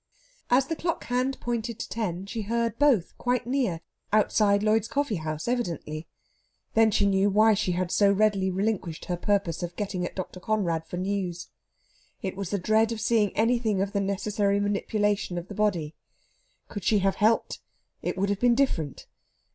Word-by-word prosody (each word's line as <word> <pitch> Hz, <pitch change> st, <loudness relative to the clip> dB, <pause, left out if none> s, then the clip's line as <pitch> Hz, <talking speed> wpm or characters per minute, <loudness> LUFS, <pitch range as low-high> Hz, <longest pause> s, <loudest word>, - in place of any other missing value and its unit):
As 255 Hz, +2 st, +4 dB
the 325 Hz, -, -3 dB
clock 335 Hz, +1 st, -2 dB
hand 255 Hz, +2 st, -1 dB
pointed 235 Hz, -1 st, -3 dB
to -, -, -5 dB
ten, 195 Hz, -5 st, -3 dB
she 220 Hz, +3 st, -4 dB
heard 230 Hz, +2 st, -1 dB
both 270 Hz, -12 st, +3 dB
quite 245 Hz, -1 st, 0 dB
near 240 Hz, -10 st, 0 dB, 0.3 s
outside 210 Hz, -1 st, +3 dB
Lloyd's 215 Hz, 0 st, +2 dB
Coffeehouse, 170 Hz, -, -2 dB
evidently. 170 Hz, -10 st, -3 dB, 0.7 s
Then 225 Hz, 0 st, +5 dB
she 205 Hz, -1 st, +2 dB
knew 195 Hz, 0 st, +3 dB
why 215 Hz, +2 st, +5 dB
she 195 Hz, -3 st, 0 dB
had 180 Hz, 0 st, -1 dB
so 200 Hz, -1 st, +4 dB
readily 200 Hz, -2 st, +2 dB
relinquished 190 Hz, -4 st, -2 dB
her 180 Hz, -, -1 dB
purpose 185 Hz, -2 st, 0 dB
of 175 Hz, 0 st, -5 dB
getting 195 Hz, -3 st, -3 dB
at -, -, -4 dB
Dr. 185 Hz, -1 st, -5 dB
Conrad 175 Hz, -6 st, -1 dB
for 180 Hz, -, -5 dB
news. 185 Hz, -2 st, -3 dB, 0.7 s
It 190 Hz, -1 st, -3 dB
was 195 Hz, -2 st, -4 dB
the 205 Hz, -, 0 dB
dread 220 Hz, +4 st, +2 dB
of 225 Hz, -, -3 dB
seeing 220 Hz, -2 st, +2 dB
anything 225 Hz, -2 st, +2 dB
of 195 Hz, +1 st, -1 dB
the 200 Hz, -, +1 dB
necessary 200 Hz, +1 st, 0 dB
manipulation 205 Hz, -2 st, 0 dB
of 175 Hz, +2 st, -6 dB
the -, -, -6 dB
body. 185 Hz, -7 st, 0 dB, 0.7 s
Could 205 Hz, -, -7 dB
she 210 Hz, -, +3 dB
have 195 Hz, 0 st, +1 dB
helped, 220 Hz, +2 st, +2 dB, 0.4 s
it -, -, -3 dB
would 200 Hz, +1 st, 0 dB
have 200 Hz, -1 st, 0 dB
been 245 Hz, -1 st, +4 dB
different. 175 Hz, -, -1 dB
205 Hz, 175 wpm, -27 LUFS, 185-225 Hz, 0.7 s, Then